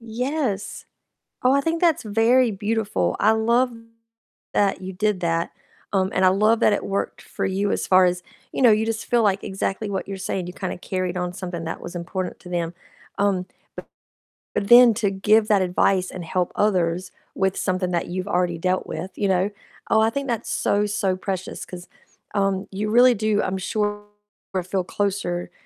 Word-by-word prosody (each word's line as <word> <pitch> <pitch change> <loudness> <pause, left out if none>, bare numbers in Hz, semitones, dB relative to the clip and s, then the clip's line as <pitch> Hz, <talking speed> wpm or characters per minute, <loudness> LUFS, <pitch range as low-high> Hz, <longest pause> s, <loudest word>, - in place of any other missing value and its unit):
Yes, 235 -1 -3 0.6
oh, 255 - +4
I 280 - +4
think 325 +3 -1
that's 335 -4 +3
very 230 +3 +3
beautiful, 215 +1 -1
I 215 - +5
love 235 +3 +2 0.8
that 200 -1 +2
you 190 +1 -5
did 205 0 0
that, 165 -1 -1 0.4
um, 190 -1 +1
and 185 - +2
I - - +7
love 215 +4 +3
that - - +4
it 205 - -1
worked 200 0 -3
for - - -5
you 195 +2 0
as - - -1
far 185 0 +6
as, 180 0 -1 0.3
you - - -2
know, 245 - +7
you 215 +1 +2
just 225 0 -3
feel 240 -1 +2
like 200 -2 +1
exactly 195 +1 -3
what 195 -1 -3
you're 195 - -4
saying, 185 -1 -3
you 180 - -6
kinda 185 -3 -4
carried 185 0 -3
on 180 -1 -2
something 180 -2 -6
that 165 - -5
was 175 - -8
important 180 +1 -4
to 180 - -12
them, 170 -1 -2 0.4
um, 195 -3 +1 1.1
b - - +2
then 240 +3 +8
to 205 -3 0
give 210 +3 +3
that 205 -2 +4
advice 185 +1 +2
and 180 -2 -7
help 180 +1 -1
others 180 -3 +1 0.2
with 190 0 +1
something 185 -1 -1
that 170 -1 -1
you've 185 +2 -4
already 180 -3 0
dealt 185 +2 0
with, 175 +5 -5
you 205 - 0
know, 190 +1 +1 0.4
oh, 220 - +5
I 220 - +4
think 280 +2 -3
that's 235 -4 -2
so, 205 +1 +1
so 200 -2 0
precious 190 -1 -4
'cause, 180 -1 -10 0.5
um, 195 -1 0
you 205 +2 -2
really 245 +3 +6
do, 215 0 +1
I'm 190 0 -2
sure, 205 +1 -2 0.6
feel 185 +1 -1
closer 185 -2 -2
195 Hz, 185 wpm, -23 LUFS, 185-215 Hz, 1.1 s, then